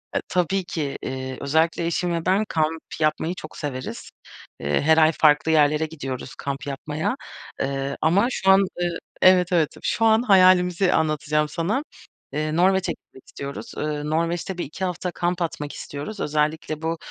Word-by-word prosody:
E, - - +1
tabii 185 +1 +1
ki. 150 -5 -3
Eee, 130 0 -5
özellikle 160 +4 +1
eşim 170 +1 0
ve 165 -1 -2
ben 195 +4 +2
kamp 160 0 0 0.2
yapmayı 160 +3 0
çok 155 - -10
severiz. 130 -3 -5 0.5
Eee, 70 +1 0
her 160 +2 +4
ay 160 0 +6
farklı 150 +1 +4
yerlere 150 0 +3
gidiyoruz 135 -5 -6
kamp 140 +1 -5
yapmaya. 150 - -2 0.5
Iıı, 135 0 -2
ama 195 +8 +3
şu 190 -5 0
an, 190 - +7
ııı 175 -3 -1 0.3
Evet, 185 -1 +6
evet, 165 -4 +2
şu 225 - +1
an 220 +1 +5
hayalimizi 185 -3 +5
anlatacağım 150 -1 +1
sana. 200 - -1 0.5
Iıı, 155 +1 -1
Norveç'e 190 +1 +3
gitmek 130 - -13
istiyoruz. 140 0 -7
Iıı, 150 0 -2
Norveç'te 170 +3 -1
1-2 175 +3 -4
hafta 180 0 -3
kamp 175 +1 -2
atmak 150 -3 -3
istiyoruz. 150 +9 -7
Özellikle 155 +1 -1
bu 165 0 -2
160 Hz, 160 wpm, -23 LUFS, 150-180 Hz, 0.5 s, an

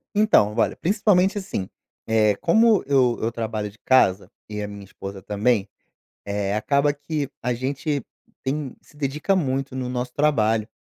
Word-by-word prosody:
Então, 210 - +4
olha, - - +2
principalmente 195 +1 +2
assim, 185 - -4 0.4
eh, 110 -2 +3
como 220 +4 +4
eu 130 -4 +3
eu 115 +1 0
trabalho 110 -2 -3
de 105 - -19
casa 100 -7 +3 0.2
e 105 0 -4
a 105 - -3
minha 100 -1 -9
esposa 95 0 -9
também, 105 +1 0 0.6
eh, 100 0 -2
acaba 140 +6 +2
que 145 0 -4
a 125 +1 0
gente 135 +3 -2 0.4
tem 140 0 -3
se 150 - -22
dedica 150 +7 0
muito 135 -5 -1
no 130 -1 -3
nosso 125 0 -3
trabalho, 115 -7 +2
130 Hz, 155 wpm, -23 LUFS, 105-150 Hz, 0.6 s, Então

